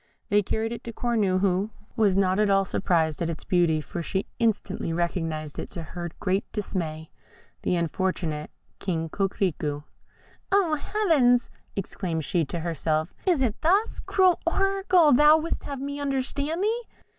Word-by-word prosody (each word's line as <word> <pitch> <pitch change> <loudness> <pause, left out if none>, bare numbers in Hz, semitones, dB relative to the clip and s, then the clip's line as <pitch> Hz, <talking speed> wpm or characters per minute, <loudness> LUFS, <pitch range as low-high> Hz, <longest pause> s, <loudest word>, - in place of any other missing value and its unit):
They 205 +1 +4
carried 220 +3 -2
it 235 - -6
to 230 - -4
Cornue, 210 -6 +1
who 195 +1 +1 0.3
was 205 -5 +3
not 190 0 +2
at 210 -1 +3
all 195 0 +4
surprised 165 -5 0
at 170 - 0
its 165 - -5
beauty, 170 -3 +2
for 170 +3 -5
she 190 +4 -2
instantly 210 -6 0
recognised, 165 -3 -2
to 170 - -6
her 175 +2 -6
great 190 +1 +1
dismay, 160 -6 -4 0.5
the - - +1
unfortunate 170 -3 -1 0.3
King 165 -4 -2
Coquerico. 165 -6 -1 0.7
"Oh, 385 -5 +3
Heavens!" 290 - +2 0.2
exclaimed 175 -5 -3
she 175 -4 +1
to 170 +4 -4
herself; 160 0 -1
"is 335 -8 +3
it 230 -5 -1
thus, 390 +8 +2
cruel 370 -3 +3
oracle, 380 -3 +3
thou 300 +4 +7
wouldst 325 +1 -3
have 280 -2 -5
me 285 +1 -4
understand 285 +4 -1
thee?" 455 +3 +1
195 Hz, 150 wpm, -26 LUFS, 170-280 Hz, 0.7 s, thou